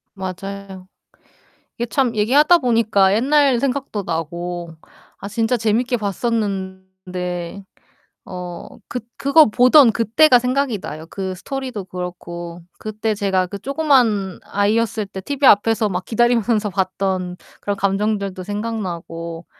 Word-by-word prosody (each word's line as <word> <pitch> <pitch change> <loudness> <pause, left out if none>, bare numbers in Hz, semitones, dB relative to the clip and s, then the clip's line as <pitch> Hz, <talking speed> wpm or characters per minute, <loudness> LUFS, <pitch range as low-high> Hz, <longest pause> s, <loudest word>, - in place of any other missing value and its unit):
맞아요. 190 0 -7 0.9
이게 240 - -1
참 250 -3 0
얘기하다 290 +11 +5
보니까 220 -6 +3
옛날 270 +1 +3
생각도 255 -6 -2
나고 170 +1 -4 0.5
아 200 - -5
진짜 225 +3 0
재밌게 235 +3 +1
봤었는데 190 -4 -4 0.6
어 180 -1 -7 0.2
그 250 - -4 0.2
그거 300 +3 +6
보던 250 +3 +6
그때가 245 +5 +4
생각이 250 -2 0
나요 155 -2 -7
그 190 -1 -4
스토리도 255 -2 -5
그렇고. 175 -1 -7 0.2
그때 215 0 -2
제가 195 -3 0
그 200 +2 -7
조그만 250 - +1
아이였을 215 +1 0
때 190 -1 -8
티비 280 +6 -1
앞에서 220 0 +4
막 180 -1 -3
기다리면서 230 -2 +2
봤던 185 -1 -2 0.2
그런 205 - -2
감정들도 200 -1 -1
생각나고 175 -6 -5
205 Hz, 270 characters per minute, -20 LUFS, 185-235 Hz, 0.9 s, 그거